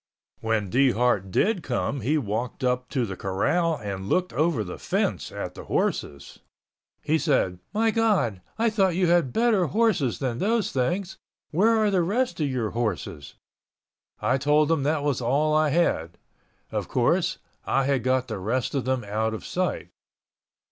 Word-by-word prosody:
When 110 -4 -1
Dehart 125 -6 +2
did 195 - +1
come 135 0 -2
he 145 +8 +1
walked 120 0 -3
up 125 0 0
to 130 -4 0
the 95 -3 -5
corral 160 - 0
and 100 -5 -6
looked 180 0 +1
over 155 -7 +1
the 90 - -8
fence - - -1
at - - -5
the - - -10
horses. 70 -1 -2 0.6
He 160 +1 +1
said, 110 - +1
"My 225 +1 +2
God, 205 - +1 0.2
I 230 0 +2
thought 190 -5 +2
you 185 0 +2
had 170 -6 +3
better 225 - +2
horses 165 - +1
than 125 -3 -3
those 225 +1 +1
things. 175 +9 -2 0.3
Where 215 +8 +3
are 215 -2 +2
the 190 -2 +3
rest 200 +1 0
of 150 -2 0
your 120 -5 -2
horses?" 90 -10 -3 0.8
I 130 +2 +1
told 150 +2 +3
him 160 -3 +2
that 145 +1 0
was 145 -4 0
all 145 +6 +1
I 155 0 +3
had. 85 - 0 0.5
Of - - -2
course, - - +1 0.3
I 135 - +1
had 135 -3 0
got 130 0 +1
the 110 -4 -4
rest 120 +7 -1
of 135 -3 -1
them 130 -2 0
out 110 +2 -1
of - - -8
sight. 180 - -2
135 Hz, 170 wpm, -25 LUFS, 115-175 Hz, 0.8 s, had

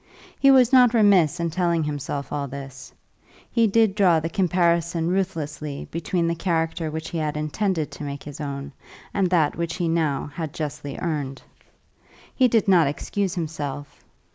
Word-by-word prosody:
He 275 - +5
was 260 -1 +5
not 250 -2 +6
remiss 195 -9 +4
in 170 -1 -1
telling 170 -1 +1
himself 145 -1 -4
all 145 -1 -2
this. 135 0 -9 0.6
He 230 -2 +3
did 220 -1 +3
draw 185 -5 +4
the 165 +1 -3
comparison 170 -3 +1
ruthlessly 155 -6 -3
between 170 +1 -1
the 170 - +1
character 165 -1 -1
which 160 +1 -5
he 165 - -3
had 150 -1 -2
intended 155 +1 -1
to - - -8
make 140 -1 -6
his 145 0 -8
own 140 -1 -5 0.4
and 195 -3 +1
that 160 -5 +2
which 170 0 -3
he 175 -2 -1
now 155 -3 0
had 160 -4 -5
justly 150 -2 -5
earned. 145 -5 -3 0.9
He 255 - +4
did 225 -2 +2
not 175 -6 +5
excuse 190 +6 -2
himself. 145 -4 -5
165 Hz, 165 wpm, -24 LUFS, 150-185 Hz, 0.9 s, not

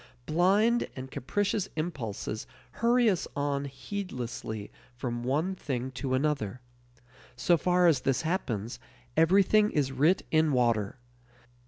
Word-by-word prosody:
Blind 200 +9 +3
and 130 0 -7
capricious 200 - -1
impulses 120 - -4 0.2
hurry 240 +1 +3
us 190 -5 +1
on 140 0 -1
heedlessly 125 - -5 0.2
from 120 -1 -3
one 150 +9 0
thing 130 -7 -4
to 130 0 -2
another. 130 -6 -1 0.8
So 175 - +3
far 180 +2 +2
as 160 -6 +4
this 135 +1 0
happens, 120 - -2 0.4
everything 195 +6 +5
is 145 -7 0
writ 150 +8 +3
in 155 -2 +3
water. 115 -3 +1
145 Hz, 120 wpm, -29 LUFS, 125-180 Hz, 0.8 s, everything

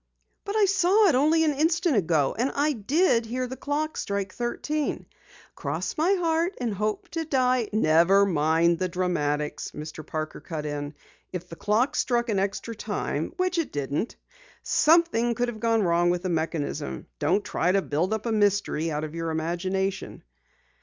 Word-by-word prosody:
"But 405 0 -3
I 430 -2 +5
saw 390 +2 +4
it - - +3
only 310 +5 +4
an 305 -2 +2
instant 325 +2 +1
ago! 160 -8 +2
And 250 +4 0
I 295 +2 +2
did 255 - +2
hear 255 +2 -2
the 255 +1 -6
clock 300 +3 -2
strike 200 -1 -3
thirteen. 290 +5 -2 0.5
Cross - - -3
my 350 +5 +3
heart 335 +1 0
and 240 -4 -1
hope 210 +2 -2
to 330 -1 -3
die 255 -6 +1
" - - -31
"Never 195 0 +4
mind 165 0 +2
the 185 - -1
dramatics," 150 -5 -1
Mr. 155 +1 -7
Parker 155 +1 -5
cut 155 -4 -5
in. 145 0 -4 0.4
"If 180 -1 -6
the 165 - -8
clock 215 +9 +1
struck 240 -1 +1
an 205 -3 +1
extra 200 +4 -2
time - - -3
which 365 -1 0
it 330 - -2
didn't 145 - -2 0.5
something 305 -8 +3
could 245 +1 0
have 220 -2 -7
gone 225 -1 +2
wrong 175 0 +3
with 175 0 0
the 185 - -1
mechanism. 160 - -3
Don't 205 - +1
try 180 - +1
to 195 0 +2
build 165 +7 -1
up 220 0 -2
a 230 - 0
mystery 205 -6 +1
out 150 -1 -2
of 155 0 -5
your 165 0 -3
imagination." 185 +4 -2
210 Hz, 175 wpm, -26 LUFS, -, 0.5 s, I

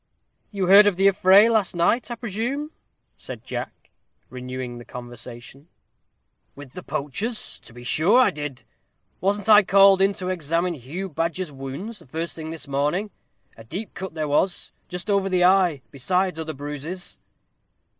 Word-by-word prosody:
"You 195 -3 -2
heard 200 +3 +8
of 205 - +2
the 195 +2 +4
affray 195 +2 +6
last 220 -6 +1
night, 175 +10 +1
I 240 - -3
presume?" 240 +7 -3 0.5
said - - -9
Jack, - - -7 0.4
renewing 125 -1 -6
the - - -10
conversation. 120 +3 -10 0.9
"With 140 -2 -12
the 180 - -7
poachers? 160 - -3
To - - -14
be 120 +1 -12
sure 160 - +3
I 255 - +5
did. 145 -4 -6 0.6
Wasn't 200 +2 0
I 210 -1 +8
called 195 0 +5
in 195 +1 +4
to 185 -1 -4
examine 170 0 -1
Hugh 160 +7 -6
Badger's 165 +1 -3
wounds 140 +12 -7
the - - -17
first 160 +5 -3
thing 160 -1 -7
this 160 -2 -6
morning; 150 +9 -1 0.4
and 115 - -13
a 110 - -25
deep 200 +3 -6
cut 190 -3 -7
there 155 -1 -2
was, 150 +6 0 0.2
just 180 +1 -6
over 200 -2 +1
the 180 -1 +2
eye, 180 -7 +3
besides 180 +5 0
other 160 -1 -4
bruises." 150 +6 -7
175 Hz, 165 wpm, -23 LUFS, 145-195 Hz, 0.9 s, heard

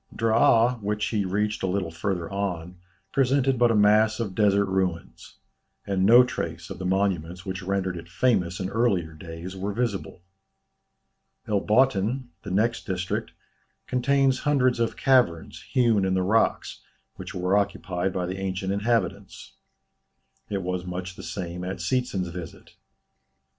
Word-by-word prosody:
Draa 115 +1 +3
which 105 +1 -1
he 105 -3 0
reached 105 +3 -1
a 95 - 0
little 90 -2 -1
farther 85 0 -3
on, 90 -3 -3 0.3
presented 135 -1 +2
but 120 -1 +5
a 115 - +2
mass 105 +1 +4
of 105 -5 -3
desert 100 -1 +3
ruins; 95 -3 -3 0.5
and 95 -1 +1
no 120 +3 +8
trace 85 -7 -5
of 95 - -7
the 95 - -3
monuments 90 -2 -1
which 95 -1 -4
rendered 95 -1 -1
it 85 -1 -9
famous 90 -5 +1
in 95 - -2
earlier 100 -8 +1
days, 85 +3 -8
were 95 +2 -3
visible. 100 -6 -3 1.2
El 105 -1 +1
Botthin, 120 +2 +2
the 105 - -8
next 115 +5 0
district, 90 -2 -3 0.5
contains 135 +1 +2
hundreds 130 -4 +2
of 115 -1 -1
caverns, 125 -12 +2
hewn 115 -5 +3
in 95 0 +1
the 95 - +1
rocks, 110 +5 +1 0.4
which - - -8
were 90 +2 +1
occupied 95 -2 -1
by 90 -1 -2
the 95 +2 -5
ancient 95 0 -2
inhabitants. 100 -2 -2 1.0
It 100 -2 -2
was 90 0 -2
much 90 0 -6
the - - -9
same 90 0 -5
at 95 +1 -4
Seetzen's 95 -2 -1
visit. 85 -1 -9
95 Hz, 150 wpm, -25 LUFS, 90-115 Hz, 1.2 s, no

